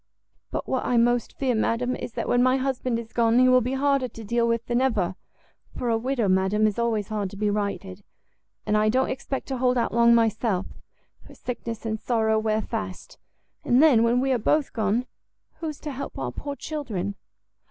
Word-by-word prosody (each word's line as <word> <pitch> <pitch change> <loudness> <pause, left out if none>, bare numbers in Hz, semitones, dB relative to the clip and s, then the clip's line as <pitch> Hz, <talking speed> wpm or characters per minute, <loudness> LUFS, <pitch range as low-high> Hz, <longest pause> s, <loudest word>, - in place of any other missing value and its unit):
But - - -4
what 260 - -1
I 245 - +1
most 240 0 +1
fear, 260 -2 +1
madam, 235 +3 0
is 235 - -7
that - - -3
when 245 - +3
my 255 +1 +4
husband 255 -2 -1
is 230 -1 -8
gone, 230 0 +3
he 255 0 +6
will 255 0 +5
be 250 +3 -2
harder 275 -1 +2
to 225 -1 -11
deal 235 +2 +1
with 230 0 0
than 240 +1 +1
ever; 220 -9 +1 0.6
for 245 - -1
a 225 - +2
widow, 245 -2 0
madam, 190 +3 +2
is 215 +1 0
always 225 -4 0
hard 210 -3 -2
to 200 - -11
be 210 0 +1
righted; 200 -2 -3 0.6
and 210 - +1
I 215 0 +3
don't 260 +4 +1
expect 270 +1 -4
to 265 - -2
hold 250 0 +2
out 235 - 0
long 235 0 +5
myself, 220 -4 +1 0.6
for - - -14
sickness 235 -2 -6
and 220 -1 -2
sorrow 220 -2 +1
wear 215 0 0
fast: 210 -5 -6 0.4
and 245 - +3
then, 285 -7 +6
when 235 +2 +3
we 270 0 +1
are 250 - +2
both 295 +6 +1
gone, 220 +2 0 0.5
who 330 - -4
is 305 -2 -5
to 300 - -5
help 270 +1 -6
our - - -3
poor 285 -1 -6
children?" 235 - -4
235 Hz, 205 wpm, -25 LUFS, 215-255 Hz, 0.6 s, he